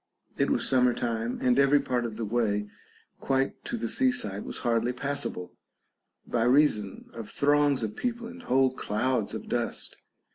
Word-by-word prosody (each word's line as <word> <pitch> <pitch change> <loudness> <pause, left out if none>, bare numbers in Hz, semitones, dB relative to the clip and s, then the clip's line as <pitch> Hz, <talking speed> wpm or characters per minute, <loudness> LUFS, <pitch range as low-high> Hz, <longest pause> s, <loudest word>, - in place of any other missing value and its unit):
It - - +1
was - - +1
summer 125 -2 +3
time, 115 0 -2
and 125 +1 +4
every 140 +1 +5
part 125 -3 -1
of 110 -2 -5
the 115 - -2
way 105 -2 0 0.5
quite 135 0 0
to 240 - -3
the - - -2
seaside 245 - 0
was - - -6
hardly 120 +1 +1
passable, 140 -8 -3 0.7
by 115 -1 0
reason 125 -7 +2
of 115 -3 -7
throngs 145 -2 +2
of 105 -1 -3
people 240 -1 -3
and 250 +2 -9
whole 130 - +2
clouds 115 -1 -1
of - - -7
dust. - - -2
125 Hz, 160 wpm, -28 LUFS, 115-140 Hz, 0.7 s, every